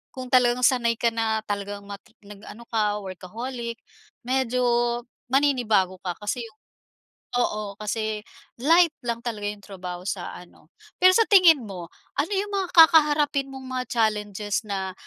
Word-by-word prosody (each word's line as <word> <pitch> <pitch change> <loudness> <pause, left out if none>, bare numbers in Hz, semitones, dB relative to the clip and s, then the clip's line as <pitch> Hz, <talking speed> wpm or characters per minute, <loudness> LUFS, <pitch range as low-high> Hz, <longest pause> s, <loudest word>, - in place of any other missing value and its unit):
kung 255 -1 -7
talagang 250 -1 +3
sanay 235 -2 +3
ka 230 +1 +1
na 220 -1 -1
talagang 205 0 -5
mat 200 0 -9 0.2
nag-ano 210 +3 -12
ka 210 -2 +1
workaholic, 235 +6 -6 0.5
medyo 255 0 0 0.6
maninibago 240 -9 +2
ka 180 - -1
kasi 230 +3 -3
'yong 220 -1 -16 0.8
oo 210 -4 -1
kasi, 215 0 -2 0.4
light 330 +2 +5
lang 235 -1 -2
talaga 210 -3 -3
'yong 205 -1 -9
trabaho 180 -2 -7
sa 185 -3 -4
ano. 175 -2 -17 0.3
Pero 370 0 +8
sa 455 - +4
tingin 345 - +6
mo 180 -5 -8 0.3
ano 300 - +1
'yong 405 +1 -1
mga 380 -2 -1
kakaharapin 300 -4 +5
mong 265 -1 -9
mga 255 -1 -3
challenges 210 -1 -1
na 190 -1 -3
230 Hz, 145 wpm, -24 LUFS, 205-265 Hz, 0.8 s, Pero